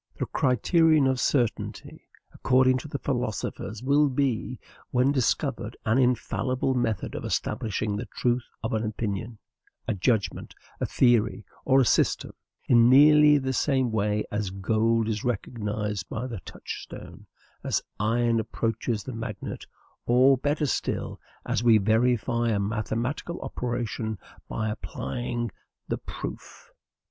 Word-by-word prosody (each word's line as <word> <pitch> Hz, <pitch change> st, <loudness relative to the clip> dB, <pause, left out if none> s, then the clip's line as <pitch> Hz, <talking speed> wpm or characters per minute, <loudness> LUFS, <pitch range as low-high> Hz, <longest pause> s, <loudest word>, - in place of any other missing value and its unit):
The -, -, -1 dB
criterion 155 Hz, -, +3 dB
of 130 Hz, -1 st, +1 dB
certainty, 120 Hz, -5 st, -1 dB, 0.3 s
according 130 Hz, 0 st, +3 dB
to 150 Hz, -, -8 dB
the 140 Hz, -, -4 dB
philosophers, 115 Hz, -3 st, -3 dB
will 145 Hz, +2 st, +4 dB
be, 130 Hz, -2 st, -1 dB, 0.3 s
when 125 Hz, +2 st, +3 dB
discovered, 130 Hz, -4 st, -1 dB
an 115 Hz, +4 st, +3 dB
infallible 130 Hz, +1 st, +1 dB
method 115 Hz, -6 st, -1 dB
of -, -, -5 dB
establishing 105 Hz, -1 st, -2 dB
the 115 Hz, +3 st, -4 dB
truth 120 Hz, 0 st, -1 dB
of 110 Hz, -, -2 dB
an 110 Hz, 0 st, 0 dB
opinion, 110 Hz, +1 st, -3 dB, 0.5 s
a -, -, +1 dB
judgment, 105 Hz, +1 st, -1 dB, 0.2 s
a -, -, -1 dB
theory, 115 Hz, -4 st, +2 dB, 0.2 s
or 135 Hz, 0 st, +5 dB
a -, -, +3 dB
system, -, -, +2 dB, 0.4 s
in 120 Hz, -1 st, +6 dB
nearly 150 Hz, +2 st, +7 dB
the 130 Hz, -1 st, -1 dB
same 130 Hz, -2 st, +1 dB
way 105 Hz, -1 st, 0 dB
as 105 Hz, -2 st, -1 dB
gold 110 Hz, +4 st, +1 dB
is 105 Hz, -2 st, -2 dB
recognized 105 Hz, -4 st, -3 dB
by 115 Hz, +3 st, -3 dB
the 115 Hz, -6 st, -5 dB
touchstone, -, -, -9 dB, 0.4 s
as -, -, 0 dB, 0.2 s
iron 115 Hz, +2 st, +2 dB
approaches 115 Hz, 0 st, -2 dB
the 130 Hz, -, -6 dB
magnet, 110 Hz, -3 st, -6 dB, 0.4 s
or, 130 Hz, +3 st, +6 dB
better 145 Hz, +4 st, 0 dB
still, 140 Hz, -, -2 dB, 0.2 s
as 115 Hz, -, -1 dB
we 115 Hz, -2 st, +6 dB
verify 115 Hz, +2 st, +2 dB
a 105 Hz, -3 st, +1 dB
mathematical 115 Hz, +10 st, -2 dB
operation 120 Hz, -3 st, -3 dB, 0.3 s
by 110 Hz, -1 st, -2 dB
applying 120 Hz, +1 st, -4 dB, 0.4 s
the -, -, -1 dB
PROOF. -, -, -8 dB
120 Hz, 130 wpm, -26 LUFS, 110-130 Hz, 0.5 s, nearly